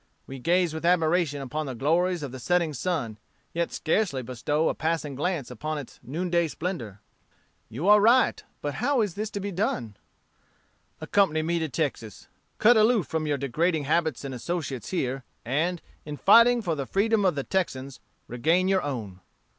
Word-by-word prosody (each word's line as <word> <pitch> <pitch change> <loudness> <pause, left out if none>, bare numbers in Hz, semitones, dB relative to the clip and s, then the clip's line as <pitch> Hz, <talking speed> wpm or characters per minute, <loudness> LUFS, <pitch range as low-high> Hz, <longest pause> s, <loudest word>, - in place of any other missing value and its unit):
We 135 0 -8
gaze 175 +3 +2
with 160 - -5
admiration 165 -4 +2
upon 150 +3 -4
the 130 - -5
glories 170 +6 +1
of 140 - -5
the 130 - -8
setting 170 +4 +1
sun, 135 -8 -3 0.3
yet 170 0 -1
scarcely 160 -6 0
bestow 130 +6 -1
a - - +1
passing 155 -3 -2
glance 145 -1 -2
upon 155 +6 -4
its 140 -4 -9
noonday 170 +4 0
splendor.' 135 - -5 0.7
"'You 145 - -4
are 210 0 +7
right; 235 +4 +4 0.2
but 145 -1 -2
how 265 0 +2
is 205 -5 -1
this 215 +3 -4
to 205 - -5
be 200 +1 -4
done?' 145 - -2 1.1
"'Accompany 155 -6 +2
me 170 +1 0
to 160 -1 -2
Texas. 125 - -4 0.3
Cut 235 +2 +6
aloof 215 -4 +4
from 160 +1 -2
your 145 -1 0
degrading 155 +4 0
habits 160 0 0
and 135 - -5
associates 135 - -4
here, 135 -7 -2 0.2
and, 160 +8 -1 0.2
in 150 -1 -7
fighting 235 +5 +6
for 170 - 0
the 140 -4 -4
freedom 210 +2 +2
of 185 -5 +2
the 140 - -2
Texans, 135 -8 -2 0.3
regain 165 +10 +1
your 190 -1 +2
own.' 110 -10 -5
160 Hz, 170 wpm, -26 LUFS, 135-180 Hz, 1.1 s, are